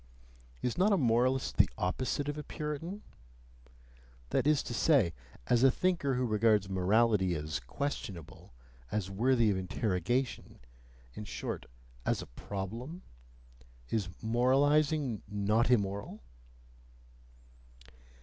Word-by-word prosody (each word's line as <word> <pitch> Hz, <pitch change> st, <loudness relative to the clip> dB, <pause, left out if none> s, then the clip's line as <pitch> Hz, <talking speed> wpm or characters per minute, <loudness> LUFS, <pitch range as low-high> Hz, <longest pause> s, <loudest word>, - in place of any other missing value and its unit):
(Is 125 Hz, -, -1 dB
not 200 Hz, +3 st, +4 dB
a 200 Hz, -, +4 dB
moralist 125 Hz, -1 st, +1 dB
the -, -, +5 dB
opposite 130 Hz, +9 st, -1 dB
of 145 Hz, -, -2 dB
a 150 Hz, -, -4 dB
Puritan? 160 Hz, +8 st, -5 dB, 1.3 s
That -, -, +1 dB
is 150 Hz, -2 st, +3 dB
to 120 Hz, -, -5 dB
say, 120 Hz, -, +3 dB, 0.3 s
as 120 Hz, -, +3 dB
a 135 Hz, -, +8 dB
thinker 165 Hz, -3 st, +1 dB
who 125 Hz, 0 st, 0 dB
regards 105 Hz, -2 st, +3 dB
morality 95 Hz, 0 st, +2 dB
as 75 Hz, 0 st, -3 dB
questionable, 100 Hz, -, -6 dB, 0.4 s
as 100 Hz, -2 st, -2 dB
worthy 115 Hz, +2 st, +3 dB
of 95 Hz, -, 0 dB
interrogation, 100 Hz, +6 st, -2 dB, 0.6 s
in 105 Hz, -, -7 dB
short, -, -, -5 dB, 0.4 s
as -, -, 0 dB
a -, -, -6 dB
problem? 115 Hz, -, -6 dB, 0.9 s
Is 105 Hz, -5 st, -1 dB
moralizing 135 Hz, +2 st, +2 dB
not 105 Hz, +3 st, +1 dB
immoral?) 100 Hz, -, 0 dB
120 Hz, 110 wpm, -32 LUFS, 100-140 Hz, 1.3 s, a